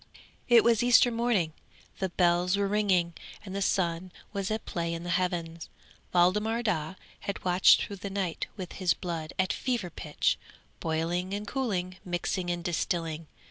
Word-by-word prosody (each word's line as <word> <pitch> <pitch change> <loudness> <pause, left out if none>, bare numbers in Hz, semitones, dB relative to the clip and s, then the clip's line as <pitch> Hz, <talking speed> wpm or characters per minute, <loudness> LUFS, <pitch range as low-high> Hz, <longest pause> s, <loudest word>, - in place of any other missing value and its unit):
'It 240 -2 +7
was 235 -1 +4
Easter 245 0 +6
morning, 230 -9 +1 0.5
the 190 - 0
bells 175 +1 +2
were 200 0 +1
ringing, 195 -4 +2 0.3
and 190 -1 -6
the 200 - -2
sun 180 -2 0 0.2
was 195 -2 -2
at 220 0 -2
play 170 -3 -2
in 165 - -6
the 175 - -3
heavens. 170 -2 -1 0.4
Waldemar 210 +6 +2
Daa 180 -5 -1 0.2
had 200 - -5
watched 180 +1 +6
through 200 - -6
the 200 +1 -5
night 190 -4 -2
with 185 -3 -6
his 185 -3 +1
blood 165 -4 -4
at 185 -1 +1
fever 235 -9 -2
pitch; 150 -1 -1 0.4
boiling 170 +4 -1
and 205 +1 -4
cooling, 190 -8 -2
mixing 175 0 -2
and 175 -1 -2
distilling. 165 -1 -2
185 Hz, 160 wpm, -29 LUFS, 170-200 Hz, 0.5 s, It